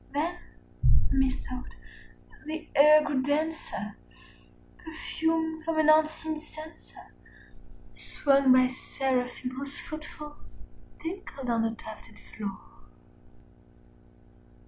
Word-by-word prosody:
Then, 340 +4 0 0.7
methought, 260 -1 -1 0.7
the 315 +1 -5
air 305 +2 +8
grew 290 -3 0
denser, 310 +4 -2 0.8
perfumed 320 0 -2
from 325 0 -1
an 310 -1 +4
unseen 315 0 +2
censer 310 +1 -12 0.8
Swung 275 -2 +3
by 255 0 +7
seraphim 255 -1 -2
whose 275 +2 -6
foot 310 -2 -7
falls 300 -1 -11 0.4
tinkled 325 -7 -5
on 230 -1 +2
the 225 0 0
tufted 220 -1 -11
floor. 200 -3 -7
295 Hz, 90 wpm, -29 LUFS, 260-315 Hz, 0.8 s, air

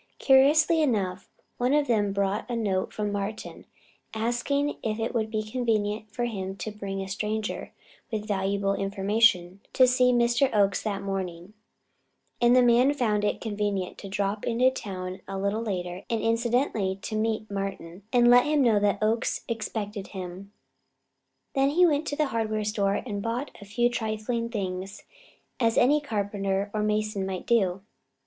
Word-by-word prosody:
Curiously 300 +4 +5
enough, 195 -9 -1 0.3
one 250 +4 +2
of 295 -1 +3
them 210 -5 +1
brought 200 +3 -1
a 240 - -1
note 200 -5 -1
from 210 -1 -2
Martin, 205 +2 -5 0.5
asking 240 +6 0
if 215 -1 -2
it 225 - -2
would 220 -2 0
be 215 -1 -2
convenient 215 -2 -1
for 240 +2 -2
him 195 -5 -4
to 215 - -5
bring 195 -2 -5
a - - -7
stranger, 215 +2 -3 0.4
with 215 -1 -3
valuable 195 -1 0
information, 195 -1 +2
to 255 - +6
see 250 0 +4
Mr. 240 +2 +3
Oakes 200 -1 +3
that 200 -2 -3
morning; 190 -1 -4 0.9
and 240 +1 +5
the 255 - +6
man 245 +4 +4
found 215 -6 +1
it 210 - 0
convenient 205 -4 -2
to 195 - -8
drop 200 +1 -2
into 245 +2 +3
town 185 -6 -6
a 195 - -4
little 200 +3 -1
later 180 -4 -4
and 230 -2 0
incidentally 230 -4 0
to 215 - -4
meet 215 -1 -1
Martin 195 -3 -5
and 240 -1 +4
let 245 0 +7
him 300 -1 +2
know 225 -4 +4
that 205 0 +1
Oakes 225 +3 0
expected 215 -3 -4
him. 190 +1 -8 1.0
Then 275 0 +3
he 350 +5 +4
went 305 -2 +1
to 290 - -2
the 300 -2 0
hardware 215 -1 -1
store 205 -2 0
and 205 -4 -4
bought 235 +6 -3
a - - -9
few 240 +4 +1
trifling 230 0 -2
things, 195 -2 -4 0.6
as 230 -2 +2
any 290 +4 +4
carpenter 200 -5 -2
or 215 - -1
mason 210 -1 0
might 190 -1 -4
do. 195 -5 +1
215 Hz, 165 wpm, -27 LUFS, 195-240 Hz, 1.0 s, let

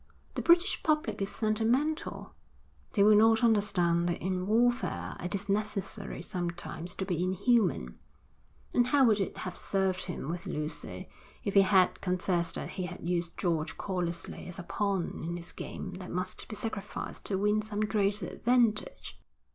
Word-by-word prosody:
The - - -2
British 345 +3 +4
public 310 -7 0
is 195 - 0
sentimental; 230 +8 0 0.6
they 200 - +4
will 210 +1 +7
not 225 +2 +5
understand 180 -6 +3
that 170 - -1
in 185 0 -2
warfare 240 +3 +1
it 180 +2 -2
is 200 0 -4
necessary 205 0 -2
sometimes 175 -2 -4
to 190 - -3
be 175 -3 -1
inhuman. 185 - +1 0.7
And 245 0 +4
how 275 0 +5
would 215 -3 +4
it 195 - -2
have 185 - -5
served 190 -1 0
him 175 -6 -5
with 170 +2 -4
Lucy 150 +1 -4 0.4
if 200 - -2
he 200 - +8
had 190 -1 +4
confessed 180 -2 0
that - - -4
he 185 -2 -3
had 175 -1 -7
used 175 -1 -1
George 165 -3 -1
callously 175 -4 -3
as 180 - -5
a 180 - -6
pawn 195 -1 -1
in 170 +1 -3
his 170 0 -9
game 190 - -6
that 185 - -8
must 185 +1 -4
be 215 - -6
sacrificed 215 -3 -5
to 195 - 0
win 210 +2 +2
some 210 -1 -3
greater 210 -2 +1
advantage?' 235 0 +1
195 Hz, 165 wpm, -30 LUFS, 175-215 Hz, 0.7 s, he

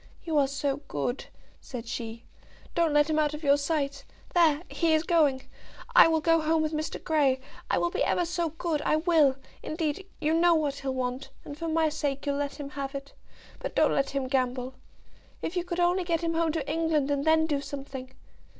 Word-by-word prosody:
"You 325 -2 -2
are 275 - +3
so 275 0 -1
good," 150 - -3 0.3
said 240 -3 -8
she. 230 0 -5 0.5
"Don't 335 -2 +2
let 295 0 +4
him 310 -1 +1
out 300 -1 +1
of 305 - -9
your 280 -1 +5
sight. 280 -1 -1 0.3
There; 330 -3 +4
he 330 -2 +2
is 310 - +1
going. 300 -7 +2 0.5
I - - +9
will 320 -1 +2
go 330 +1 +3
home 315 0 +2
with 310 0 -2
Mr. 310 0 -2
Grey. 285 -5 +2 0.3
I - - +2
will 345 - +1
be - - 0
ever 350 - +1
so 340 -1 -1
good; 320 -1 -2
I - - +2
will, 310 -4 +4 0.3
indeed. 315 +3 -3
You 310 +1 +1
know 340 +1 +5
what 290 -3 0
he'll 270 -1 -2
want, 255 +1 -3 0.2
and 285 - -7
for 330 +3 -5
my 320 0 +2
sake 285 -2 -3
you'll 280 -1 0
let 285 +1 -3
him 285 -1 -6
have 275 -1 -5
it. 275 0 -7 0.5
But - - -5
don't - - +4
let 275 0 +1
him 275 -2 -2
gamble. 255 -1 -1 0.7
If 335 - -3
you 355 - 0
could 350 0 -4
only 355 +1 +3
get 340 -1 0
him 335 -1 -1
home 330 -1 +1
to 310 -4 -3
England, 310 -2 +1
and 280 -1 0
then 315 0 +4
do 290 -3 -1
something. 270 -2 -7
300 Hz, 210 wpm, -28 LUFS, 275-325 Hz, 0.7 s, I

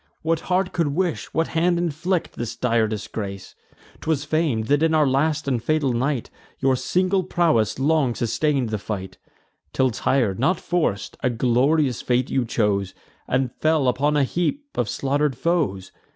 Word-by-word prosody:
What 165 0 +1
heart 185 +1 +1
could 170 -3 +1
wish, 180 -2 -1
what 165 0 0
hand 170 +2 +2
inflict, 175 +2 -1
this 120 -1 -5
dire 115 -2 +1
disgrace? 100 -2 -6 0.5
'Twas 155 -3 -1
fam'd, 150 -8 0
that 145 +4 +2
in 160 0 +3
our 155 -1 +4
last 150 +3 +1
and 125 -4 0
fatal 150 -2 +1
night 130 +1 -1 0.3
Your 135 -1 +2
single 185 +7 +1
prowess 160 - +1
long 140 -3 +2
sustain'd 135 +1 0
the 110 -1 -2
fight, 95 -2 -6 0.5
Till 130 -1 +2
tir'd, 115 -3 0
not 170 +9 +2
forc'd, 155 - -1
a 125 - +2
glorious 125 +3 +2
fate 125 +1 0
you 130 -2 +1
chose, 100 -5 0 0.3
And 125 -1 0
fell 155 -4 +2
upon 145 +4 +2
a 145 - +4
heap 175 - -1
of 120 -4 -1
slaughter'd 140 -1 0
foes. 135 - -1
135 Hz, 160 wpm, -23 LUFS, 115-160 Hz, 0.5 s, our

